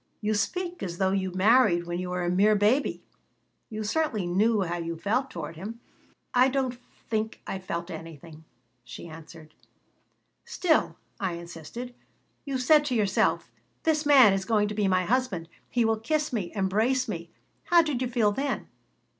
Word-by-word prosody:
"You 215 Hz, 0 st, 0 dB
speak 350 Hz, -, -2 dB
as 175 Hz, -2 st, -4 dB
though 190 Hz, 0 st, +2 dB
you 190 Hz, -1 st, -1 dB
married 195 Hz, -1 st, +4 dB
when 175 Hz, 0 st, -3 dB
you 180 Hz, 0 st, -4 dB
were 180 Hz, 0 st, -2 dB
a -, -, 0 dB
mere 205 Hz, +4 st, +4 dB
baby. 215 Hz, +8 st, +1 dB, 0.7 s
You 215 Hz, -1 st, -4 dB
certainly 225 Hz, -, 0 dB
knew 205 Hz, +5 st, +2 dB
how 175 Hz, -1 st, -3 dB
you 170 Hz, -1 st, -4 dB
felt 250 Hz, +10 st, 0 dB
toward 165 Hz, -5 st, -7 dB
him." 215 Hz, +7 st, -7 dB, 0.5 s
"I 250 Hz, +1 st, +5 dB
don't 260 Hz, -2 st, -1 dB, 0.3 s
think 220 Hz, 0 st, -2 dB
I 190 Hz, -, -4 dB
felt 170 Hz, -1 st, -5 dB
anything," 160 Hz, -1 st, -10 dB, 0.4 s
she 120 Hz, +7 st, -9 dB
answered 160 Hz, -1 st, -12 dB, 0.9 s
"Still," 360 Hz, -8 st, +1 dB, 0.2 s
I 190 Hz, -3 st, -1 dB
insisted, 170 Hz, +8 st, -8 dB, 0.5 s
"you 275 Hz, -2 st, -2 dB
said 295 Hz, +4 st, +5 dB
to 260 Hz, -4 st, -1 dB
yourself, 205 Hz, -4 st, +1 dB, 0.3 s
'This 310 Hz, -2 st, +1 dB
man 260 Hz, -8 st, +8 dB
is 195 Hz, 0 st, -1 dB
going 210 Hz, -1 st, +2 dB
to -, -, -4 dB
be 210 Hz, -1 st, +1 dB
my 185 Hz, -1 st, +2 dB
husband; 220 Hz, -7 st, 0 dB, 0.2 s
he 240 Hz, -2 st, +1 dB
will 225 Hz, -1 st, +1 dB
kiss 300 Hz, +5 st, -1 dB
me, 200 Hz, -7 st, -2 dB
embrace 220 Hz, +7 st, +1 dB
me.' -, -, -5 dB, 0.4 s
How 345 Hz, -1 st, +5 dB
did 290 Hz, -6 st, -2 dB
you 255 Hz, -, 0 dB
feel 235 Hz, -4 st, +2 dB
then?" 275 Hz, +5 st, -3 dB
210 Hz, 170 wpm, -27 LUFS, 180-255 Hz, 0.9 s, man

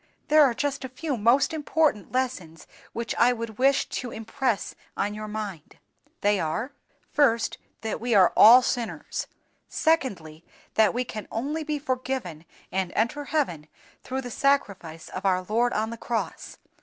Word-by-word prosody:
There 305 Hz, 0 st, +7 dB
are 255 Hz, -4 st, +3 dB
just 280 Hz, 0 st, -2 dB
a 260 Hz, -, -5 dB
few 280 Hz, +3 st, -3 dB
most 245 Hz, +7 st, +3 dB
important 305 Hz, -7 st, 0 dB
lessons 240 Hz, -11 st, -3 dB, 0.3 s
which 235 Hz, 0 st, -3 dB
I 245 Hz, +1 st, +5 dB
would 230 Hz, -2 st, -6 dB
wish 270 Hz, +1 st, +3 dB
to 250 Hz, -, -4 dB
impress 225 Hz, 0 st, -2 dB, 0.2 s
on 205 Hz, +1 st, -1 dB
your 215 Hz, 0 st, -6 dB
mind. 210 Hz, -7 st, -6 dB, 0.4 s
They 205 Hz, -1 st, +3 dB
are: 210 Hz, -, -2 dB, 0.4 s
"First, 235 Hz, -6 st, +2 dB, 0.2 s
that 220 Hz, -1 st, -4 dB
we 240 Hz, -1 st, +1 dB
all 185 Hz, -3 st, +6 dB
are 245 Hz, +4 st, +9 dB
sinners. 240 Hz, -2 st, -3 dB, 0.4 s
"Secondly, 190 Hz, -, 0 dB, 0.3 s
that 220 Hz, 0 st, +3 dB
we 250 Hz, -, +1 dB
can 215 Hz, -3 st, -7 dB
only 290 Hz, +8 st, -2 dB
be 300 Hz, -1 st, -2 dB
forgiven 255 Hz, -, -3 dB, 0.3 s
and 190 Hz, -2 st, -1 dB
enter 285 Hz, +7 st, 0 dB
heaven 220 Hz, -, -1 dB, 0.3 s
through 265 Hz, +1 st, -4 dB
the 245 Hz, -2 st, -7 dB
Sacrifice 200 Hz, -, 0 dB
of 185 Hz, -, -6 dB
our 185 Hz, -2 st, +2 dB
Lord 230 Hz, +5 st, +1 dB
on 220 Hz, +1 st, -1 dB
the 230 Hz, -, -6 dB
cross. 230 Hz, 0 st, -4 dB
235 Hz, 155 wpm, -26 LUFS, 205-265 Hz, 0.4 s, are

